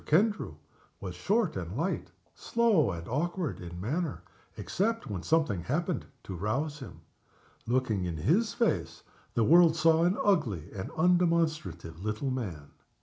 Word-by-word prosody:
Kendrew 205 +7 +2 0.4
was - - -5
short - - +1
and - - -4
light - - -2 0.2
slow 225 - +2
and 85 -1 -5
awkward 170 +5 -2
in 85 -1 -8
manner, 150 - -2 0.3
except 225 +4 -1
when 100 -5 -4
something 150 - +1
happened 165 - -2 0.2
to 95 - -6
rouse 135 - -2
him. 130 - -10 0.7
Looking 115 -6 +1
in 85 -2 -3
his 180 - +2
face, 155 - -1 0.3
the 115 - +3
world 165 +4 +6
saw 165 0 +4
an 180 +3 +2
ugly 115 - +1
and 95 -2 -5
undemonstrative 160 - +1
little 110 +6 -2
man. 90 - -5
145 Hz, 140 wpm, -30 LUFS, -, 0.7 s, world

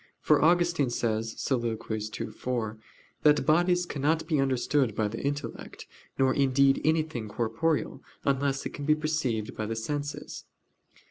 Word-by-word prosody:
For - - +3
Augustine 170 -4 +3
says 115 -1 -1
(Soliloq. 120 -4 -1 0.3
ii, - - -4
4) 110 -1 -3 0.4
that 150 -1 +4
"bodies 175 +3 +3
cannot 155 +1 0
be 155 -4 +1
understood 135 -2 +1
by 110 - +1
the 115 +2 -5
intellect; 145 +1 -4 0.3
nor 130 -1 +3
indeed 135 0 +3
anything 155 -7 0
corporeal 135 +9 -1 0.2
unless 140 0 0
it - - -4
can 145 - -6
be 150 +1 +4
perceived 155 -9 -2
by 110 - -3
the 115 - -3
senses." 145 +6 -4
140 Hz, 140 wpm, -28 LUFS, 115-155 Hz, 0.4 s, that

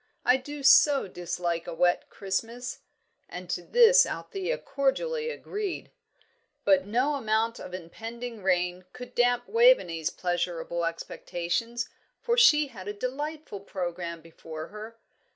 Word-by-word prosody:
I 250 - +6
do 290 +2 -8
so 275 -1 +6
dislike 175 -2 -3
a 170 - -5
wet 175 +1 +2
Christmas." 230 +6 -4 0.5
And - - -7
to - - -2
this - - +6
Althea 395 +6 -3
cordially 460 - -1
agreed. 415 -5 -5 0.7
But 285 -4 +4
no 250 +7 +1
amount 225 -3 0
of 180 - -7
impending 225 +6 -7
rain 180 -1 0
could 250 0 -9
damp 245 0 +2
Waveney's 455 - +4
pleasurable 170 -1 -2
expectations, 175 +8 -3 0.3
for 475 0 0
she 300 - +6
had 200 -6 -10
a 205 - -3
delightful 280 +2 -5
programme 175 -3 -5
before 160 -1 -9
her. 215 +2 -9
230 Hz, 125 wpm, -28 LUFS, 180-285 Hz, 0.7 s, I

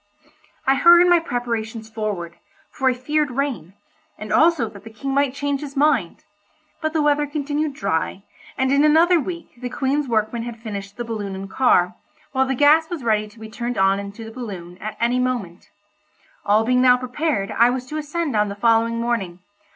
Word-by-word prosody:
I 270 - +4
hurried 345 +5 +6
my 350 -1 +6
preparations 230 -6 -4
forward, 210 -6 -4 0.3
for 265 -1 +1
I - - +2
feared 295 +4 0
rain, 245 - -3 0.4
and 215 0 -5
also 320 -7 +4
that 200 -2 -12
the 225 - -10
King 270 +5 -5
might 280 -1 +1
change 285 -1 -2
his 280 -1 -8
mind; 275 - +1 0.6
but 315 0 -1
the 315 -2 +1
weather 295 0 +2
continued 290 0 -2
dry, 195 -2 -2 0.3
and 265 0 +1
in 280 +1 +4
another 330 +3 +5
week 340 +2 -6
the 250 - -4
Queen's 275 +3 -1
workmen 225 0 0
had 235 0 -6
finished 205 -2 -7
the 240 - -4
balloon 210 -4 -4
and 195 0 -8
car, 180 -8 +3 0.4
while 265 -1 +1
the 265 - 0
gas 305 +4 +4
was 335 -7 -5
ready 215 -2 +1
to 215 +2 -18
be 220 - -8
turned 240 +2 -4
on 195 +1 +3
into 200 +3 -8
the 225 - -9
balloon 190 -7 -8
at 215 +1 -6
any 240 +2 +1
moment. 235 -9 -3 0.8
All 215 +2 +3
being 250 +1 +3
now 250 -1 +6
prepared 250 -4 -2
I 235 +1 +4
was 250 0 -3
to 300 +4 -6
ascend 305 -2 -3
on 210 -1 +2
the 200 - -5
following 230 +1 +2
morning. 230 -7 -2
245 Hz, 190 wpm, -21 LUFS, 215-285 Hz, 0.8 s, hurried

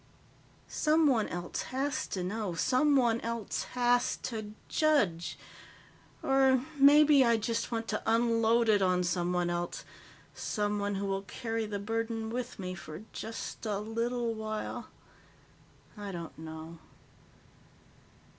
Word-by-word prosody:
Someone 300 -7 +3
else 175 0 -4
has 270 +1 -1
to 185 - -3
know. 200 -1 -3
Someone 255 - +3
else 230 -2 -3
has 245 0 +3
to 215 -3 -4
judge. 210 - +1 0.9
Or 265 -1 +4
maybe 290 0 +7
I 235 -2 +4
just 230 +2 -2
want 225 -1 -2
to 215 - -1
unload 230 0 +3
it 210 -2 +4
on 180 -1 +2
someone 175 0 0
else, 175 0 -3 0.5
someone 205 -1 -1
who 200 +1 -2
will 195 0 -1
carry 225 +3 -3
the 205 -1 -3
burden 225 +2 -2
with 250 +1 -4
me 185 -2 -4
for 155 +1 -9
just 225 0 -6
a 205 -2 0
little 230 +2 -1
while. 215 -1 -4 1.1
I 205 -2 -6
don't 170 -3 -7
know." 160 +1 -9
225 Hz, 120 wpm, -31 LUFS, 195-240 Hz, 1.1 s, maybe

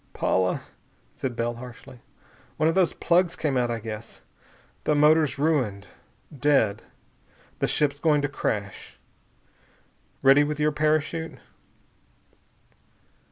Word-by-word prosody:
"Paula," 95 -1 0 0.5
said 130 -3 -4
Bell 120 0 -2
harshly, 125 0 -11 0.6
"one 155 - +2
of 165 - +2
those 185 -2 +3
plugs 175 0 +1
came 150 -6 -1
out, 125 -1 +1
I 115 - -1
guess. 110 0 -8 0.7
The 150 - +2
motor's 150 -1 +4
ruined. 130 -10 0 0.5
Dead. 135 -7 +2 0.8
The - - +1
ship's 145 -1 0
going 150 -2 +2
to - - +2
crash. 105 -7 -4 1.3
Ready 135 +2 +6
with 150 0 -3
your 150 0 +2
parachute?" 155 +2 -1
145 Hz, 115 wpm, -25 LUFS, 120-155 Hz, 1.3 s, Ready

